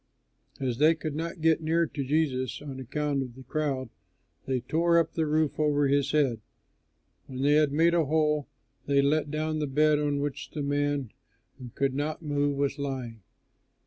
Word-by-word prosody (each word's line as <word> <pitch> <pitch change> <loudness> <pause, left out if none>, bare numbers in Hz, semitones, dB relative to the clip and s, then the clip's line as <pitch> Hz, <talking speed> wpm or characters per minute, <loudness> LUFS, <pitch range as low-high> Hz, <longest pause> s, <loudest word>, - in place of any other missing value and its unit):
As 125 -3 -2
they 155 +2 +5
could 155 -2 -5
not 165 +2 -4
get 160 0 +3
near 165 +2 +2
to 145 -3 -4
Jesus 130 -3 0
on 140 -2 -7
account 140 +2 -2
of 125 -3 -6
the 130 - -11
crowd, 135 -2 -2 0.6
they 130 -2 0
tore 170 +4 +2
up 165 -1 +1
the 160 -2 0
roof 155 0 0
over 145 -1 +2
his 140 0 +2
head. 135 -8 +1 0.9
When 130 0 -5
they 145 - +4
had 150 -1 +4
made 165 +4 +3
a 170 -2 +3
hole, 150 -1 +1 0.4
they 140 -1 +3
let 150 +1 +1
down 155 +1 -2
the 150 - -1
bed 150 +2 +3
on 145 -1 0
which 145 -1 -4
the 150 - -4
man 145 -3 -1 0.5
who 125 -2 -8
could 135 -1 0
not 150 +4 -3
move 145 -1 0
was 140 0 -1
lying. 130 -5 -4
145 Hz, 180 wpm, -28 LUFS, 135-155 Hz, 0.9 s, they